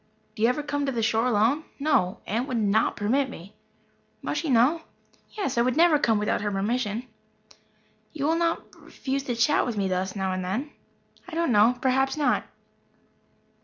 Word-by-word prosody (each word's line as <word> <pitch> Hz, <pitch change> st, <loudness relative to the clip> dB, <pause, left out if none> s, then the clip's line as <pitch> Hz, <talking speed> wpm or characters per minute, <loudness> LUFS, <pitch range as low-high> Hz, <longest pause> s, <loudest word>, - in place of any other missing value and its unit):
"Do 215 Hz, -, -9 dB
you 230 Hz, -, +5 dB
ever 290 Hz, +4 st, -1 dB
come 285 Hz, -1 st, -2 dB
to -, -, 0 dB
the 235 Hz, -3 st, -2 dB
shore 225 Hz, +2 st, +2 dB
alone?" 240 Hz, +7 st, +2 dB
"No. 240 Hz, -9 st, +1 dB
Aunt 235 Hz, +6 st, -2 dB
would 255 Hz, -4 st, -2 dB
not 215 Hz, 0 st, +2 dB
permit 260 Hz, +6 st, 0 dB
me." 190 Hz, -3 st, -11 dB, 0.7 s
"Must -, -, -2 dB
she 325 Hz, -, -3 dB
know?" 265 Hz, +7 st, +3 dB, 0.5 s
"Yes. 385 Hz, -, -2 dB
I -, -, +5 dB
would 255 Hz, +3 st, +1 dB
not 325 Hz, -3 st, +5 dB
come 225 Hz, -2 st, +3 dB
without 210 Hz, 0 st, 0 dB
her 205 Hz, -, -1 dB
permission." 210 Hz, +3 st, -1 dB, 1.1 s
"You 290 Hz, -3 st, -3 dB
will 320 Hz, +2 st, +2 dB
not 335 Hz, 0 st, 0 dB, 0.2 s
refuse 275 Hz, 0 st, -4 dB
to 245 Hz, -, -2 dB
chat 245 Hz, +6 st, +3 dB
with 235 Hz, -4 st, -3 dB
me 195 Hz, -1 st, 0 dB
thus 185 Hz, +1 st, -2 dB
now 190 Hz, -1 st, -1 dB
and 185 Hz, 0 st, -3 dB
then?" 235 Hz, +11 st, -3 dB, 0.6 s
"I 345 Hz, -, -8 dB
don't 335 Hz, -4 st, +1 dB
know. 225 Hz, +3 st, +4 dB
Perhaps 265 Hz, +2 st, +1 dB
not." 295 Hz, -, +1 dB
245 Hz, 185 wpm, -26 LUFS, 210-285 Hz, 1.1 s, you